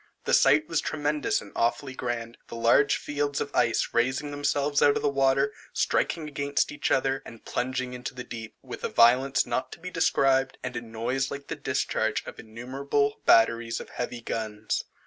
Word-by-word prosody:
The - - 0
sight 150 +3 +5
was 165 -3 0
tremendous 150 0 -1
and 105 - -12
awfully 130 +3 0
grand; 120 -2 -4
the - - -8
large 120 +5 +4
fields 145 -1 -2
of 145 - -4
ice 115 -2 +2
raising 130 +5 0
themselves 145 0 0
out 145 - +5
of - - -2
the 145 - +3
water, 135 +1 +2 0.2
striking 160 -2 0
against 140 - -1
each 300 - -2
other, 135 0 +1
and 115 - -13
plunging 130 0 -2
into 125 +1 -6
the 125 - -6
deep, 115 -2 -8
with - - -8
a - - -1
violence 130 +3 +4
not 130 +2 -2
to - - -12
be 180 +2 -7
described, 135 -5 +2
and 125 -1 -4
a 120 - -2
noise 120 +4 -2
like 140 0 -7
the - - -2
discharge - - -1
of - - -9
innumerable 135 +5 -2
batteries 115 0 +4
of - - -9
heavy 120 -1 -5
guns. 110 -2 -3
130 Hz, 185 wpm, -27 LUFS, 120-145 Hz, 0.2 s, sight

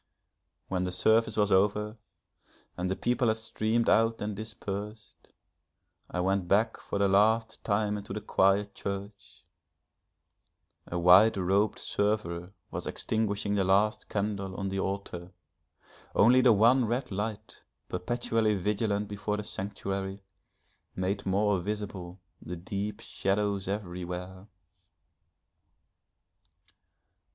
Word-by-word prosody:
When 90 -1 -1
the 90 - -2
service 110 +4 +3
was 105 -1 +2
over 105 +2 +2 0.8
and 90 +1 -2
the 95 - 0
people 120 +2 +1
had 110 0 +2
streamed 110 +1 -1
out 115 +1 +3
and 105 0 -3
dispersed, 105 0 -7 0.8
I 90 - -3
went 95 0 0
back 110 +5 +2
for - - -5
the 100 0 +3
last 110 +3 +2
time 105 0 0
into 100 - -10
the 105 - -3
quiet 100 +1 +2
church. 100 -1 -7 1.4
A 85 - -3
white 90 +5 +6
robed 95 +3 +1
server 100 -4 -1 0.2
was - - -5
extinguishing 105 -2 -1
the 100 -2 +2
last 100 +3 +2
candle 100 -2 -2
on 95 0 -3
the 95 0 -2
altar; 95 -2 -4 0.8
only 125 +5 +6
the 125 - +6
one 115 +4 +5
red 120 +3 -2
light 105 +2 -5 0.3
perpetually 110 +3 0
vigilant 105 +1 0
before 105 +1 -3
the 105 - -4
sanctuary, 95 -1 -4 0.7
made 95 +2 -2
more 100 0 +2
visible 100 -2 -5 0.2
the 90 +1 -6
deep 100 +4 -4
shadows 100 0 -1
everywhere. 90 -1 -5
100 Hz, 115 wpm, -29 LUFS, 95-105 Hz, 1.4 s, white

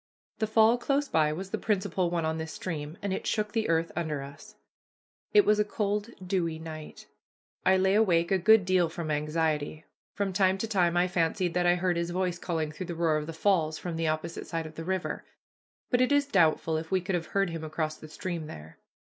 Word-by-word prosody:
The 220 - +1
fall 220 +2 +4
close 280 +3 0
by 155 - +2
was 190 +5 -5
the - - -2
principal 190 -4 0
one 170 -2 -1
on 160 0 -1
this 160 0 -5
stream, 155 -2 -5
and 200 -2 -1
it - - -4
shook 210 -1 0
the 225 0 -1
earth 165 0 +1
under 155 -4 -2
us. 140 +1 -12 0.8
It 415 -2 +6
was 210 0 +4
a - - +5
cool, 210 0 -1 0.2
dewy 175 -4 -1
night. 160 -1 -9 0.6
I 190 0 +6
lay 190 +1 +3
awake 180 -5 +3
a 190 - +3
good 215 +1 +6
deal 185 -2 +3
from 165 -1 -4
anxiety. 150 0 -1 0.3
From 200 -2 -1
time 190 0 +3
to 225 - -3
time 180 -5 +2
I 180 +1 +3
fancied 175 0 0
that 175 0 +2
I 175 - +5
heard 180 -1 0
his 170 0 -1
voice 180 -1 -1
calling 160 -4 -2
through 175 +3 -7
the 170 - -4
roar 165 -2 +2
of 150 0 -4
the - - -4
falls 160 -2 +1
from 175 -2 -5
the 165 0 -1
opposite 155 +2 -3
side 165 -1 -3
of 155 - -8
the 165 - -6
river; 185 +1 -2 0.7
but 245 -1 +3
it 255 - +3
is 285 0 +4
doubtful 165 - +2
if 160 0 -5
we 190 - +2
could 185 +2 -3
have 170 -2 -1
heard 195 -3 +2
him 165 -1 -5
across 155 0 -2
the 155 - -11
stream 165 0 -5
there. 80 - -11
175 Hz, 225 wpm, -29 LUFS, 160-195 Hz, 0.8 s, It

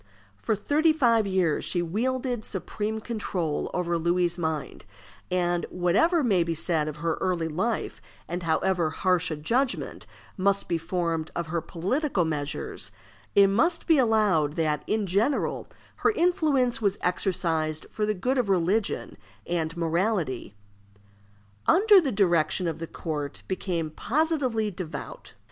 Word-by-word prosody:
For 220 - +1
thirty 300 +10 +2
five 230 -8 +3
years 185 -5 +1
she 175 -1 0
wielded 245 +6 -1
supreme 210 +4 -3
control 185 -9 -2
over 175 -1 -1
Louis's 175 +1 +1
mind; 160 -4 -3 0.5
and 175 -1 0
whatever 210 - +2
may 200 -8 +3
be 165 0 -1
said 160 -1 0
of 155 - -4
her 165 +1 -2
early 180 -3 0
life, 190 +9 -2 0.3
and 175 +2 -4
however 170 0 +1
harsh 180 +1 +1
a 155 - -2
judgment 240 - -1 0.3
must 200 +1 +1
be 170 - 0
formed 165 -1 -2
of 170 -2 -3
her 170 0 -1
political 190 - -1
measures, 150 -2 -3 0.4
it 200 - +8
must 320 - +2
be 325 -4 +4
allowed 210 - +3
that, 155 -2 0
in 215 -1 0
general, 200 +10 0 0.3
her - - +3
influence 310 - +2
was 200 -2 +1
exercised 165 -4 -1
for 215 - -3
the 215 - 0
good 255 +8 0
of 230 -5 0
religion 190 - 0 0.3
and 165 -1 -2
morality. 165 - -1 1.1
Under 405 0 +7
her 275 - 0
direction 175 -3 +2
the 165 - -5
court 150 -4 -5
became 175 -4 -2
positively 255 - 0
devout. 185 - -7
185 Hz, 135 wpm, -26 LUFS, 165-225 Hz, 1.1 s, it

